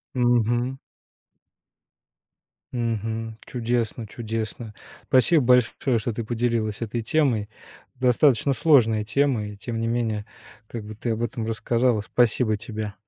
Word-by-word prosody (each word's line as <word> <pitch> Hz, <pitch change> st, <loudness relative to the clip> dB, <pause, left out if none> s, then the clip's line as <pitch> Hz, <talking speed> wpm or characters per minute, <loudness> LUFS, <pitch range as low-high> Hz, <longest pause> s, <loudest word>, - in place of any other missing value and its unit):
Мгм. 120 Hz, +1 st, +2 dB, 2.0 s
Мгм. 115 Hz, -1 st, -3 dB
Чудесно, 120 Hz, -1 st, -2 dB
чудесно. 110 Hz, 0 st, -5 dB, 0.3 s
Спасибо 145 Hz, +5 st, +4 dB
большое, 125 Hz, 0 st, +3 dB
что 115 Hz, +2 st, -3 dB
ты 115 Hz, +1 st, -4 dB
поделилась 115 Hz, -2 st, -1 dB
этой 115 Hz, +1 st, -2 dB
темой. 115 Hz, -5 st, +1 dB, 0.5 s
Достаточно 130 Hz, +1 st, +3 dB
сложная 120 Hz, -8 st, +4 dB
тема 130 Hz, -2 st, +1 dB
и, 105 Hz, -, -8 dB
тем 115 Hz, +3 st, -5 dB
не 115 Hz, -, -1 dB
менее, 115 Hz, -3 st, -1 dB, 0.4 s
как 115 Hz, -2 st, -6 dB
бы 105 Hz, 0 st, -9 dB
ты 115 Hz, +2 st, -3 dB
об 115 Hz, +2 st, -2 dB
этом 115 Hz, -1 st, -3 dB
рассказала, 115 Hz, 0 st, +1 dB
спасибо 110 Hz, 0 st, +1 dB
тебе. 110 Hz, -1 st, -5 dB
115 Hz, 120 wpm, -24 LUFS, 110-125 Hz, 2.0 s, Спасибо